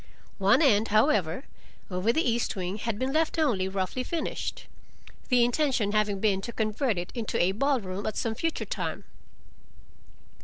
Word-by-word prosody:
One 200 +11 +4
end, 220 -5 +4
however, 215 - +2 0.5
over 185 +5 +1
the 320 +3 +1
east 235 -1 0
wing, 185 +1 -3
had 230 -1 -2
been 260 +3 -1
left 320 +1 +1
only 235 -13 +2
roughly 190 +5 -2
finished, 325 +3 -4 0.6
the 245 -2 +5
intention 245 -5 +1
having 210 -2 +1
been 195 -2 +1
to 235 - -5
convert 220 0 0
it 175 0 -4
into 230 -3 -2
a 175 +2 +3
ball 275 +6 +1
room 190 0 -5
at 215 - -3
some 225 - -1
future 330 +8 -2
time. - - -4
220 Hz, 160 wpm, -28 LUFS, 195-260 Hz, 0.6 s, the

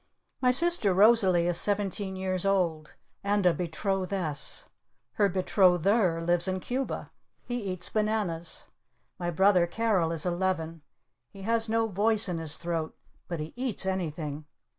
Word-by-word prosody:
My 250 - +3
sister 255 - +4
Rosalee 195 -4 +5
is 175 0 +1
seventeen 200 -1 -1
years 185 -1 -2
old. 175 -6 -1 0.3
And 200 -1 0
a 180 - +5
Betrothess. 180 -2 -1 0.5
Her 200 -1 +2
Betrother 185 0 +2
lives 175 0 +2
in 185 0 -1
Cuba. 255 +7 -4 0.3
He 245 -1 -3
eats 185 -1 -3
bananas. 210 -7 -2 0.5
My 175 - -2
brother 180 0 +3
Carol 195 -4 0
is 165 0 -3
eleven. 175 -3 -2 0.5
He 195 - -12
has 225 +1 +1
no 225 0 +1
voice 215 +1 +2
in 175 -3 -3
his 160 -2 -3
throat. 165 -2 -4 0.3
But 170 -3 -4
he 155 - -7
eats 245 -6 -2
anything. 155 -5 -3
185 Hz, 140 wpm, -28 LUFS, 170-210 Hz, 0.5 s, Rosalee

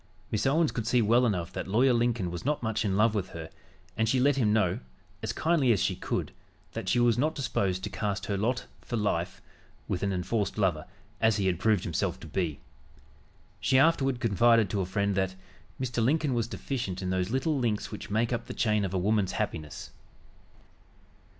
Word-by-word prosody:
Miss 110 +5 +1
Owens 155 +3 +3
could 115 -2 -4
see 125 - +3
well 120 +3 +4
enough 90 -4 -2
that - - -4
Lawyer 125 +6 +4
Lincoln 115 -6 +1
was 85 - -5
not 145 -1 -1
much 110 0 0
in 100 -2 0
love 110 +1 +4
with 100 -4 -2
her, 80 -1 -7 0.4
and 110 0 +1
she 130 - +2
let 140 +2 +4
him 115 -6 +2
know, 105 -5 +2 0.4
as - - -2
kindly 160 -7 +2
as 105 - +3
she - - +1
could, - - -3 0.4
that - - -4
she 120 - +3
was 120 -1 +3
not 155 +4 +1
disposed 95 - -1
to - - -3
cast 100 -1 -2
her 100 - -1
lot 120 +5 -1 0.2
for 120 - -4
life 95 -3 -1 0.4
with 90 - -2
an 100 - 0
enforced 95 +4 -1
lover, 90 -7 0 0.3
as 110 -1 +4
he 100 - 0
had 90 -3 +1
proved 105 -2 +2
himself 85 - -1
to - - -9
be. 85 -7 -2 1.0
She 130 - +3
afterward 135 -3 +3
confided 115 -1 +3
to 100 - 0
a 90 - -2
friend 100 +1 0
that 95 -1 0 0.4
"Mr. 120 -3 -1
Lincoln 145 +2 +2
was 115 -2 0
deficient 115 -8 -4
in 90 - -1
those 95 0 0
little 135 +4 0
links 115 -4 -1
which 105 - -7
make 115 +4 +1
up 120 -1 -3
the - - -6
chain 105 -2 +2
of 95 -1 -2
a - - +2
woman's 100 +1 +1
happiness." 75 -2 -4
110 Hz, 200 wpm, -28 LUFS, 95-120 Hz, 1.0 s, well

